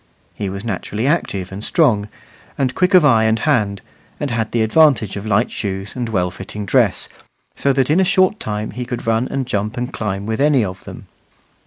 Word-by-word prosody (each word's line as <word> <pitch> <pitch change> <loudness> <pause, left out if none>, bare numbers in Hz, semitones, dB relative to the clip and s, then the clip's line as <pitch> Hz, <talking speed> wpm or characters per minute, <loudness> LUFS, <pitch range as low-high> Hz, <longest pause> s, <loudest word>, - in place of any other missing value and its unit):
He 100 -2 -4
was 100 +2 -6
naturally 105 +1 -3
active 100 - -1
and 100 +2 -7
strong, 110 -11 +2 0.5
and 130 -2 0
quick 185 +4 +2
of 175 -4 +7
eye 115 -5 +4
and 110 0 +2
hand, 110 -9 0 0.4
and 145 -3 -2
had 110 -2 -1
the 115 -2 +1
advantage 120 -4 +3
of 100 +1 -6
light 110 +3 +1
shoes 95 -1 -4
and 120 -2 -3
well 90 -4 0
fitting 100 +3 -7
dress, - - +2 0.5
so 140 - +1
that 135 +1 +1
in 165 - +4
a - - +5
short 185 +3 +2
time 105 0 -4
he 125 +5 -5
could 125 -1 -5
run 115 +2 +1
and 135 -1 -2
jump 105 0 -2
and 125 +3 -3
climb 100 -2 -3
with 110 +4 -2
any 140 -6 +3
of 90 -1 -8
them. - - -10
110 Hz, 205 wpm, -19 LUFS, 100-135 Hz, 0.5 s, of